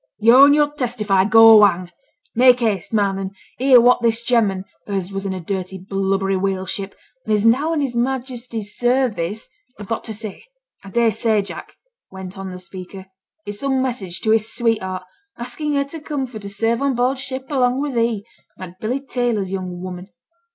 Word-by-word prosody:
'Yo' 235 +6 +7
and 285 +1 +5
yo'r 295 -1 +2
testify 220 -8 +1
go 225 0 +8
hang. 180 -3 +2 0.4
Make 250 +1 +5
haste, 205 -6 -1
man 200 -3 +1
and 195 0 -5 0.2
hear 260 -1 +7
what 245 +1 +4
this 230 0 +1
gem'man, 210 -6 +1 0.2
as 195 -2 -3
was 195 0 -4
in 190 - -2
a - - -5
dirty 190 +1 -4
blubbery 195 +1 -1
whale 190 0 -1
ship, 195 +1 -5 0.3
and 220 - -4
is 210 0 +2
now 270 +8 +3
in 315 -3 0
his 270 -3 -2
Majesty's 240 -4 -3
service, 235 -6 0 0.3
has 205 - -8
got 225 +3 -3
to 220 - -5
say. 215 - -7 0.4
I 195 - -10
dare 230 +3 +2
say, 215 0 +1
Jack,' - - -8 0.3
went 190 -1 -9
on 195 -1 -6
the 180 - -7
speaker, 185 +1 -10 0.3
'it's 205 0 -6
some 270 -1 0
message 210 -9 -4
to 220 - +1
his 220 0 +2
sweetheart, 190 -6 -1 0.3
asking 285 +5 -3
her 280 - +2
to 285 +4 -8
come 295 -3 -3
for 240 -4 -9
to 200 -1 -8
serve 225 +4 0
on 275 -2 +1
board 255 +2 0
ship 265 0 -5
along 255 -2 +2
with 285 -1 -2
he, 230 -3 0 0.3
like 185 -1 -10
Billy 245 +5 -2
Taylor's 240 -8 -2
young 185 -2 -5
woman.' 180 0 -7
220 Hz, 190 wpm, -20 LUFS, 195-250 Hz, 0.4 s, go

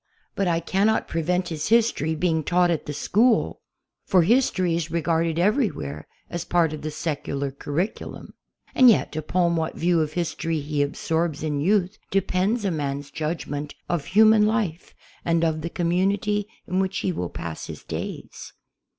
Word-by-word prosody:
But 195 - 0
I 165 -1 +2
cannot 195 +6 +1
prevent 180 +3 -1
his 155 -2 -3
history 220 -9 +2
being 160 -1 +1
taught 175 +2 +3
at 165 - -2
the - - -2
school, 220 - +2 0.4
for 185 -3 +4
history 185 -5 +2
is 165 -1 -2
regarded 165 0 0
everywhere 175 - 0 0.2
as 170 -1 -4
part 170 -3 +2
of 155 - -6
the 155 - -3
secular 140 -3 -3
curriculum. 145 +9 -4 0.4
And 255 -1 +7
yet, 215 - +2
upon 170 +2 +1
what 160 -1 -2
view 170 -1 +2
of 155 -1 -2
history 165 -1 -2
he 145 0 -2
absorbs 160 +2 -1
in 150 -2 -1
youth 190 +3 +1
depends 195 +3 0
a 195 - +1
man's 145 -2 -3
judgment 150 -2 -4
of 165 -5 -1
human 215 +1 +5
life 210 -7 -2 0.3
and 165 0 +1
of 155 -1 0
the 170 - -3
community 195 +4 0 0.2
in 185 - -1
which 190 0 0
he 185 - +2
will 90 - -3
pass 85 -2 -6
his - - -8
days. - - -7
170 Hz, 160 wpm, -24 LUFS, 155-190 Hz, 0.4 s, And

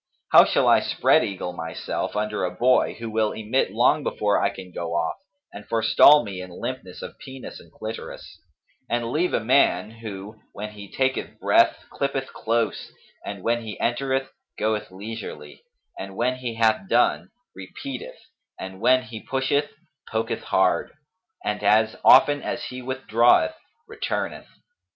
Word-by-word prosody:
How - - +9
shall - - +2
I - - +6
spread - - +3
eagle 90 -2 -4
myself 80 +3 -4
under 105 0 -1
a - - +1
boy, 130 +1 +2
who 115 - -7
will 110 -1 0
emit 110 +3 0
long 125 +8 +3
before 105 -6 0
I - - +2
can 95 -1 -10
go 85 -1 -4
off 85 -1 0 0.4
and 105 - -9
forestall 115 +5 +6
me 95 -4 -6
in 90 - -8
limpness - - -6
of - - -9
penis 130 -1 -9
and - - -18
clitoris; 110 +1 -8 0.5
and 120 -1 -1
leave 175 +6 +1
a - - +1
man 110 -5 +2
who, 110 -2 -9
when 105 +1 -6
he 100 -2 -11
taketh 130 0 -1
breath - - +3
clippeth 135 -1 -3
close 115 0 -1 0.3
and 100 -2 -7
when 120 +1 +1
he 110 -2 -8
entereth 135 +2 -1 0.3
goeth 105 0 -1
leisurely, 95 -7 -8 0.4
and 95 0 -7
when 125 +3 0
he 120 -3 -5
hath 110 -4 +1
done, 120 +1 +2 0.3
repeateth, 455 - -8 0.4
and 95 +1 -8
when 130 +2 +4
he 110 -3 -9
pusheth 135 +2 0 0.4
poketh 115 +1 -2
hard, - - +1 0.5
and 105 0 -2
as 110 +2 +3
often 145 +2 +7
as 120 0 -4
he 125 +1 -6
withdraweth, 130 - +3 0.3
returneth?' 450 0 -4
115 Hz, 150 wpm, -24 LUFS, 105-130 Hz, 0.5 s, How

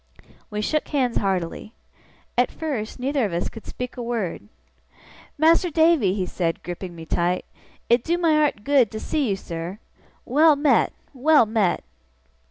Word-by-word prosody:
We 210 0 -3
shook 305 +8 -1
hands 255 -5 0
heartily. 190 +2 -2 0.6
At 245 +1 +3
first, 270 -9 -4
neither 270 +1 0
of 200 -5 -1
us 170 - -1
could 225 - -12
speak 250 0 -6
a - - -4
word. 220 - -3 0.9
'Mas'r 330 +4 +4
Davy!' 315 - +3
he 190 -3 -1
said, 170 -2 -2
gripping 175 0 -6
me 165 -1 -9
tight, 175 +2 0 0.4
'it 235 0 +3
do 340 +2 0
my 330 -3 +3
art 295 -9 +1
good 275 -5 +4
to 215 - -4
see 285 +1 -1
you, 195 - +1
sir. 170 0 -6 0.5
Well 305 +4 +5
met, 290 +1 +3 0.2
well 285 0 +4
met! 215 -5 0
235 Hz, 160 wpm, -23 LUFS, 190-295 Hz, 0.9 s, Well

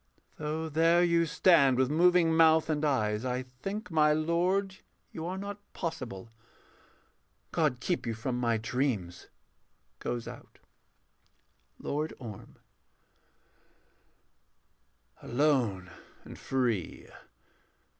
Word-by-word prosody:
Though 155 +1 -3
there 165 +3 +3
you 170 -1 +2
stand 150 -7 +4
with 130 +1 +2
moving 170 0 +4
mouth 160 0 +5
and 150 0 -1
eyes, 110 -7 0
I 125 0 -2
think, 175 - -7
my 150 -1 +4
lord, 180 +5 0 0.3
you 165 +1 -6
are 185 +1 -4
not 200 +1 -6
possible 130 - -6 1.2
God 150 -6 +1
keep 170 +1 -2
you 115 - -2
from 120 +3 -3
my 115 -2 +1
dreams. 110 -5 -2 0.7
[Goes 120 -1 -4
out.] - - -11 1.2
LORD 150 +2 -3
ORM. 110 -6 -10 2.7
Alone 120 - 0 0.3
and - - -11
free. 120 -9 -2
150 Hz, 100 wpm, -30 LUFS, 120-165 Hz, 2.7 s, mouth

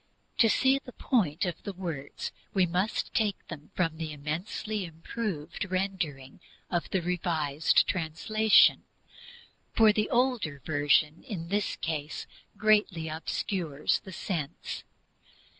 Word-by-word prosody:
To 225 - +6
see 265 +4 +4
the 250 -3 -12
point 185 - +1
of 175 - -4
the 200 - -5
words 165 -7 -5 0.2
we 190 -2 +5
must 180 +5 -1
take 210 -4 0
them 150 -3 -8
from 165 -3 0
the 160 -1 -4
immensely 175 +8 -3
improved 165 +1 -4
rendering 175 -8 -2 0.3
of 175 -2 -1
the 190 -3 0
Revised 160 -4 +2
translation, 200 +5 +4 0.9
for 220 -2 +6
the 210 0 0
older 235 - +1
Version 150 +1 +2
in 175 -10 -6
this 205 +1 0
case 155 -2 -3 0.3
greatly 205 -7 +3
obscures 160 -1 -1
the 190 - -11
sense. 160 -4 -4
175 Hz, 120 wpm, -29 LUFS, 155-210 Hz, 0.9 s, To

